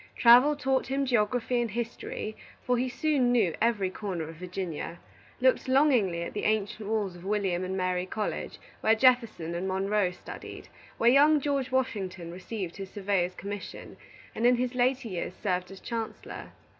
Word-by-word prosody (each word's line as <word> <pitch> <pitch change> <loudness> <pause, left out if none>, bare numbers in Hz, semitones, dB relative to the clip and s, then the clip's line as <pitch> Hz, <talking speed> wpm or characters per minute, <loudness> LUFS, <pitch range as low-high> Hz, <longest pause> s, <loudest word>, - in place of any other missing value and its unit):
Travel 250 +5 +7
taught 270 -2 0
him 275 +1 0
geography 245 0 +1
and 235 - -1
history, 225 -1 -4 0.3
for 250 - +2
he 250 +1 0
soon 260 -1 +1
knew 215 -9 +3
every 210 -5 +2
corner 185 -6 -4
of 160 0 -10
Virginia; 180 -2 -5 0.4
looked 260 +1 +3
longingly 255 - +3
at - - -6
the - - -3
ancient 215 0 -1
walls 205 -5 -1
of 175 - -12
William 195 -3 0
and 190 +1 -3
Mary 185 0 -1
College, 210 +2 -3 0.2
where 220 +1 +4
Jefferson 230 -9 +3
and 175 +2 -2
Monroe 195 +1 +1
studied; 180 - -10 0.3
where 235 +1 +5
young 295 +3 +6
George 280 -2 -1
Washington 190 -9 -2
received 185 0 -6
his 195 -1 -6
surveyor's 195 -3 -1
commission, 200 0 -7 0.4
and 235 - +2
in 250 - +5
his 250 +1 -1
later 255 0 +1
years 180 -3 -4
served 180 -3 -2
as 195 0 -10
Chancellor. 230 -2 -6
215 Hz, 165 wpm, -28 LUFS, 185-250 Hz, 0.4 s, Travel